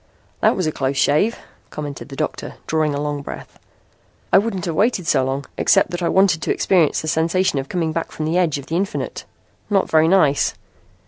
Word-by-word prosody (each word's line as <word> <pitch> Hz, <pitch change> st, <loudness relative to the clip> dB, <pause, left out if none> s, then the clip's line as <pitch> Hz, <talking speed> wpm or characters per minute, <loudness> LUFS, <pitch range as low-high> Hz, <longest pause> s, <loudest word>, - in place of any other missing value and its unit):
"That -, -, +3 dB
was 185 Hz, -, -1 dB
a 155 Hz, -, 0 dB
close 135 Hz, -1 st, -2 dB
shave," 155 Hz, -, +2 dB, 0.3 s
commented 145 Hz, -2 st, -7 dB
the 135 Hz, -, -8 dB
doctor, 155 Hz, +2 st, -4 dB
drawing 155 Hz, -2 st, 0 dB
a -, -, -2 dB
long 145 Hz, -1 st, -3 dB
breath. -, -, -9 dB, 0.7 s
"I -, -, +8 dB
wouldn't 200 Hz, -4 st, -3 dB
have 170 Hz, -, -2 dB
waited 200 Hz, 0 st, +1 dB
so 145 Hz, -, +2 dB
long, 135 Hz, +2 st, -2 dB
except -, -, +3 dB
that 175 Hz, 0 st, -4 dB
I 170 Hz, -, +1 dB
wanted 190 Hz, -4 st, +3 dB
to -, -, -1 dB
experience 175 Hz, -6 st, +2 dB
the 155 Hz, -, -6 dB
sensation 165 Hz, 0 st, +1 dB
of 135 Hz, -, -6 dB
coming 165 Hz, -3 st, -1 dB
back 165 Hz, +1 st, -3 dB
from 155 Hz, -, -4 dB
the 165 Hz, +3 st, +1 dB
edge 165 Hz, -5 st, +1 dB
of 140 Hz, -, -8 dB
the 165 Hz, -, -2 dB
infinite. 195 Hz, +4 st, -3 dB, 0.4 s
Not 195 Hz, -2 st, +1 dB
very 160 Hz, 0 st, +5 dB
nice! 160 Hz, -6 st, +3 dB
160 Hz, 205 wpm, -20 LUFS, 145-185 Hz, 0.7 s, I